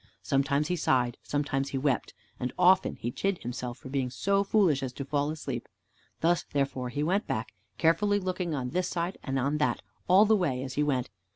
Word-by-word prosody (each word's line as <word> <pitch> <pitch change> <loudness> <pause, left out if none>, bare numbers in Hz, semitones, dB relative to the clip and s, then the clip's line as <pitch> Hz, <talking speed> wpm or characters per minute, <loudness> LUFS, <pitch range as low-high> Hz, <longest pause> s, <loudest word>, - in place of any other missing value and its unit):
Sometimes 140 +3 +1
he 180 - +1
sighed, 125 -7 +1
sometimes 140 -1 -1
he 135 - -2
wept, 135 -2 0 0.2
and 125 0 -2
often 185 +1 +4
he 120 - -4
chid 195 +7 -1
himself 120 0 -4
for - - -10
being 135 -2 -1
so 195 +10 +1
foolish 190 -9 +3
as 130 -2 -3
to 140 - -5
fall 145 +1 0
asleep. 155 0 -4 0.5
Thus 170 +1 +3
therefore 135 -3 -2
he 145 +5 -2
went 190 +6 +1
back, 110 +1 -3 0.2
carefully 205 +5 +3
looking 185 -3 -2
on 125 -2 -3
this 180 +1 0
side 175 +2 -3
and 135 -1 -2
on 140 +4 0
that 150 - 0 0.2
all 190 +4 +7
the 220 +1 +5
way 140 -10 0
as 130 -1 -5
he 145 - 0
went. 130 -6 0
145 Hz, 200 wpm, -29 LUFS, 130-180 Hz, 0.5 s, all